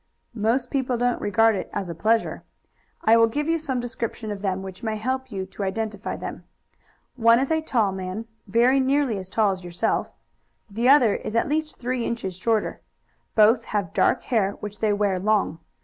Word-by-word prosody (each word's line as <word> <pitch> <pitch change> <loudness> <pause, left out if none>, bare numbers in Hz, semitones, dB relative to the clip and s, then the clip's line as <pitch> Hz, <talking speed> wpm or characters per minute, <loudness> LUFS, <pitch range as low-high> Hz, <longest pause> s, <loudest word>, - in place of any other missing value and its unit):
"Most 235 +3 0
people 260 -3 0
don't 245 0 0
regard 225 +2 +3
it - - -4
as 200 -2 -3
a 170 - -4
pleasure. 220 +7 0 0.6
I 225 - +6
will 230 0 +6
give 295 +7 -2
you 330 0 +1
some 270 -5 -2
description 235 -2 -4
of 200 -1 -5
them 190 -1 -1
which 190 +1 -9
may 220 -2 -2
help 260 +3 -3
you 190 -2 -3
to 205 - -10
identify 205 +1 -3
them. - - -7 0.7
One 230 -1 +6
is 270 +4 0
a 320 0 +2
tall 230 -10 +1
man, 190 +3 -5 0.2
very 240 +6 +4
nearly 265 -5 +1
as 185 0 -8
tall 210 0 +2
as 185 -1 -5
yourself; 175 +5 -1 0.6
the 230 +4 0
other 260 -7 +6
is 215 - -6
at 230 - +2
least 310 +1 -2
three 250 0 -2
inches 210 -7 -3
shorter. 215 +4 -1 0.5
Both 225 +2 +5
have 200 -5 -2
dark - - +2
hair 205 -5 +1
which 205 0 -8
they 215 -1 +2
wear 205 -2 +1
long. 205 -4 +1
225 Hz, 190 wpm, -24 LUFS, 200-245 Hz, 0.7 s, I